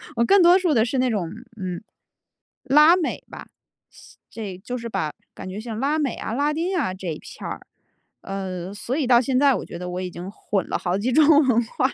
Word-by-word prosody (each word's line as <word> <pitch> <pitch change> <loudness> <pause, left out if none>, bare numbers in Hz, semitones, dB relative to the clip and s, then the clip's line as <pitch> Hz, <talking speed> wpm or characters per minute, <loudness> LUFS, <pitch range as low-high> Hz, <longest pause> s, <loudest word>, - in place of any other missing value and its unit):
我 235 - +2
更 390 +7 +5
多 350 +2 +7
数 355 -4 +1
的 220 0 +4
是 255 +2 -1
那 255 -1 +2
种， 185 -7 -2 0.3
嗯， 180 0 -4 0.8
拉 300 +6 +6
美 360 - -2
吧， - - -9 0.8
这 195 -5 -7
就 250 0 -4
是 235 0 -6
把 190 -8 -2 0.2
感 185 - -8
觉 195 +3 -6
像 225 -1 -6
拉 290 +4 +1
美 280 -6 0
啊、 220 - -5
拉 290 +4 +1
丁 355 +4 -1
啊 235 - 0
这 185 -1 -8
一 155 -2 -3
片 - - -9
儿， - - -7 0.6
呃， 190 -2 -5
所 240 +5 -4
以 290 -5 0
到 240 -2 +6
现 255 0 +1
在， 280 -2 +5
我 - - -4
觉 - - -8
得 180 0 -5
我 180 +1 -4
已 180 -1 -5
经 180 +3 -7
混 200 -2 -3
了 - - 0
好 175 +1 -1
几 250 +5 0
种 305 +3 +5 0.2
文 240 -1 +3
化 255 +3 0
了。 - - -7
235 Hz, 245 characters per minute, -23 LUFS, 190-280 Hz, 0.8 s, 多